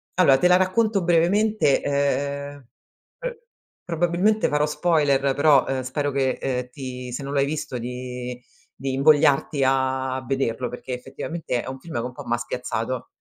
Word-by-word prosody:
allora 150 -7 +5
te 180 - +3
la 180 0 +6
racconto 195 +1 +1
brevemente, 175 0 +3
ehm, 140 0 -1 0.5
pr - - -5 0.5
probabilmente 175 +6 +1
farò 150 0 +2
spoiler, 150 -3 +2 0.2
però, 145 -2 +5
uhm, 135 -1 -1
spero 145 +3 -2
che, 135 -1 +1
ehm, 125 -2 -2
ti 125 -1 -7
se 140 - -4
non 140 - -5
l'hai 140 -1 +3
visto 145 -3 -4
di 125 0 -6 0.4
di 135 -1 -2
invogliarti 145 0 +3
a 130 0 0
vederlo, 130 -2 -1
perché 125 +1 -6
effettivamente 135 +1 -4
è - - -10
un 130 - -5
film 165 -5 -9
che - - +1
un 125 - -5
po' - - -9
m'ha 120 - 0
spiazzato. 120 0 -4
140 Hz, 160 wpm, -23 LUFS, 130-160 Hz, 0.5 s, la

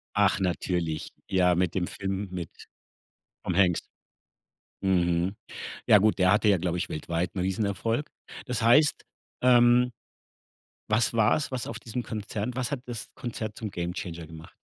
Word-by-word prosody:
Ach 100 -1 +3
natürlich. 85 -3 -1 0.2
Ja, 90 -2 +3
mit 90 -1 +1
dem 90 -2 -1
Film 95 0 -3
mit 90 -3 -5 0.9
Tom 90 - -2
Hanks. 90 -4 +4 1.0
Mhm. 90 0 +2 0.5
Ja 105 - +8
gut, 105 +1 +2
der 95 0 +5
hatte 105 +1 +3
ja, 100 - +5
glaube 90 0 -1
ich, - - -2
weltweit 85 +4 -3
'n 95 - -2
riesen 95 +3 0
Erfolg. 115 +7 -1 0.4
Das 125 -3 -2
heißt, 145 +6 +4 0.4
ähm, 125 0 +5 1.0
was 110 +2 +2
war's, 115 +6 +2
was 130 -2 -3
auf 115 - -5
diesem 120 +1 -4
Konzert 105 +1 -4
was 125 0 -2
hat 140 -4 -2
das 120 -3 -5
Konzert 110 -3 -5
zum 110 -2 -5
Gamechanger 85 -2 -5
gemacht? 80 0 -12
100 Hz, 150 wpm, -27 LUFS, 90-115 Hz, 1.0 s, Ja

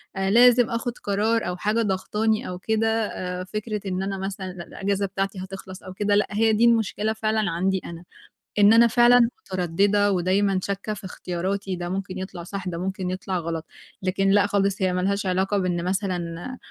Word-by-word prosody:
آآ، 190 0 0
لازم 240 +2 +6
آخُذ 230 +1 -2
قرار 215 +1 +1
أو 180 0 -3
حاجة 215 +5 0
ضاغطاني 210 +2 0
أو 180 0 -6
كده 220 +3 0 0.2
آآ، 180 -1 -5
فكرة 210 +2 -4
إن 190 0 -2
أنا 195 0 -3
مثلًا 190 -1 -5
الإجازة 195 +3 -3
بتاعتي 195 0 -3
هتخلَص 190 0 -8
أو 185 - -8
كده، 205 +1 +1
لأ 205 - +2
هي 220 +1 +3
دي 220 +2 +4
المشكلة 220 -2 +2
فعلًا 215 -3 0
عندي 190 +3 0
أنا، 170 0 -8 0.6
إن 205 +1 +7
أنا 235 +1 +7
فعلًا 240 0 +5
متردّدة 195 +3 +1
ودايمًا 190 +1 +2
شاكّة 200 +2 -3
في 205 - -9
اختياراتي 185 +2 -3
ده 175 0 -5
ممكن 190 0 -4
يطلَع 185 -2 -6
صح، 195 +1 -6
ده 170 -2 -3
ممكن 185 +1 -3
يطلَع 185 0 -3
غلط، 165 -1 -4 0.4
لكن 195 +1 +1
لأ 200 +1 +4
خالص 200 -1 0
هي 185 -1 +2
مالهاش 195 +2 0
علاقة 190 +2 +1
بإن 180 -3 -1
مثلًا 185 +3 -3
195 Hz, 180 wpm, -24 LUFS, 185-210 Hz, 0.6 s, إن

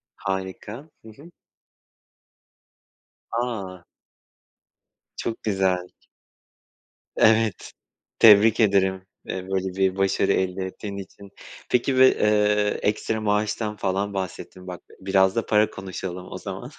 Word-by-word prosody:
Harika. 95 +8 -5 0.2
Hı - - -11
hı. 145 +10 -15 2.0
A! 100 -7 -4 1.3
Çok 115 - -4
güzel. 95 -3 0 1.3
Evet. 110 -1 +2 0.5
Tebrik 110 0 +7
ederim, 95 -3 +2 0.2
eee, - - -4 0.2
böyle 95 -1 -2
bir 95 -1 +2
başarı 95 0 +1
elde 95 0 -1
ettiğin 100 +1 -7
için. 100 0 -11 0.4
Peki 125 +2 +1
bir, 130 - +4
eee, 105 -1 +2
ekstra 110 +1 -1
maaştan 105 +1 -1
falan 100 +1 -2
bahsettin, 95 -1 -6
bak 90 -1 -7 0.2
biraz 95 0 +2
da 115 - -1
para 105 -1 +3
konuşalım 95 -1 -7
o - - -5
zaman. - - -7
100 Hz, 105 wpm, -24 LUFS, 95-110 Hz, 2.0 s, Tebrik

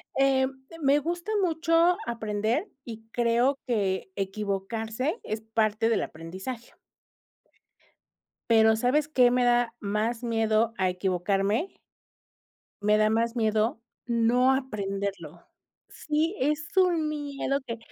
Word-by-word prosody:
Em, 270 -1 +3 0.2
de 330 - -11
me 280 -1 +3
gusta 345 +6 -4
mucho 330 0 +3
aprender 225 - -2
y 225 -2 -9
creo 240 +3 +2
que 195 -6 -1
equivocarse 215 - -3
es 215 +1 -3
parte 220 0 0
del 230 - +1
aprendizaje. 190 +10 -8 1.8
Pero, 220 -1 +5
¿sabes 255 +6 +1
qué 250 -5 +4
me 250 0 +2
da 240 -1 +2
más 215 +4 -2
miedo 225 -1 +1
a 185 -1 +2
equivocarme? 195 - 0 1.1
Me 210 +1 +3
da 215 0 +3
más 230 +1 0
miedo 220 0 +1 0.3
no 240 +2 +3
aprenderlo. 200 - -4 0.4
Sí, 310 +5 -1
es 300 +4 0
un 355 -4 +3
miedo 285 -2 -2
que 230 -1 -4
230 Hz, 115 wpm, -27 LUFS, 215-275 Hz, 1.8 s, Pero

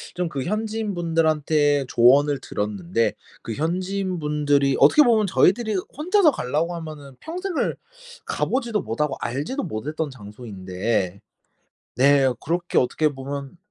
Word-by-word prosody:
좀 175 -1 -1
그 135 -5 -4
현지인분들한테 165 -8 0
조언을 140 +4 +4
들었는데 105 +1 -1 0.3
그 115 - -4
현지인분들이 155 - 0
어떻게 150 - +7
보면 220 -5 +3
저희들이 215 +4 +2 0.2
혼자서 350 +2 +3
가려고 160 - -2
하면은 155 -5 -9
평생을 360 +2 -3 0.5
가 - - -1
보지도 235 -5 -1
못하고 135 +5 -2
알지도 145 - -3
못했던 150 +2 -4
장소인데 100 -4 -4 0.7
네, 135 0 +4
그렇게 170 +2 -2
어떻게 150 +4 +2
보면 140 +2 -7
150 Hz, 305 characters per minute, -23 LUFS, 130-185 Hz, 0.7 s, 어떻게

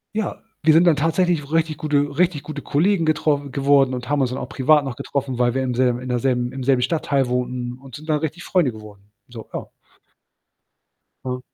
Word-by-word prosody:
Ja, 220 - -3 0.2
wir 155 0 +6
sind 170 +2 +5
dann 160 - +5
tatsächlich 165 +2 +1
so 140 - -12
richtig 160 0 0
gute 145 -2 0
richtig 175 -5 +1
gute 155 -2 -6
Kollegen 170 +3 +1
getroffen 150 -2 0
geworden 140 0 +3
und 125 0 -5
haben 145 -1 +1
uns 130 - +1
dann 130 - -4
auch 125 - -6
privat 145 +3 +3
noch 130 -3 -4
getroffen, 135 -2 -3
weil 120 -1 +2
wir 130 0 0
im 125 - -1
selb 125 0 +1
in 125 0 -7
der 125 -1 0
selben 125 -1 0
im 130 -1 -6
selben 130 -1 +3
Stadtteil 140 -2 0
wohnten 125 0 -2
und 135 -2 -12
sind 155 +2 -11
dann 150 -1 +2
richtig 160 +3 -4
Freunde 175 -9 +1
geworden. 105 -2 -14 0.2
So, 115 -3 -11
ja. - - -5 1.6
Hm. 125 0 -3
140 Hz, 215 wpm, -21 LUFS, 125-155 Hz, 1.6 s, wir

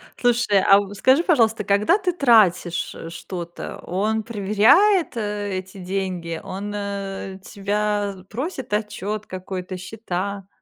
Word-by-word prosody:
Слушай, 240 -5 +3
а 195 0 +6
в 205 0 -5
скажи, 265 - +4
пожалуйста, 225 - +3
когда 205 - +3
ты 375 -3 -1
тратишь 210 - +3
что-то, 175 0 -7
он 215 +4 -1
проверяет, 235 - +3
э, 205 -2 -2
эти 185 +1 -8
деньги? 180 -3 -3
Он, 205 +2 -5
э, 195 -1 -5
тебя 205 0 -1
просит 260 - -5
отчёт 210 0 -2
какой-то, 185 0 -6
счета? 195 0 -5
205 Hz, 120 wpm, -22 LUFS, 190-225 Hz, -, а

